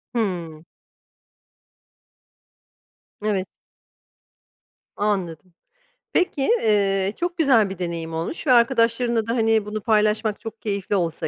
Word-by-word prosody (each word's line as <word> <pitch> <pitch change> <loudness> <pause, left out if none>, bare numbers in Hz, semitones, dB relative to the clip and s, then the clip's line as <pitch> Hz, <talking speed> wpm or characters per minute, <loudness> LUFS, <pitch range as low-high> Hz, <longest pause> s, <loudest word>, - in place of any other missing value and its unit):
Hıı. 170 -8 -3 2.6
Evet. 195 -3 0 1.5
Anladım. 185 -4 -2 0.6
Peki, 360 -6 +1
eee, 200 - +2
çok 350 +1 -3
güzel 255 -10 +4
bir 190 -1 -8
deneyim 170 -2 -4
olmuş 165 - -4
ve - - +4
arkadaşlarınla 235 -1 +3
da, 230 - 0
hani, 225 -2 +2
bunu 210 0 -4
paylaşmak 215 -1 +1
çok 225 0 -9
keyifli 200 -1 -2
olsa 170 -4 -1
210 Hz, 100 wpm, -23 LUFS, 190-230 Hz, 2.6 s, güzel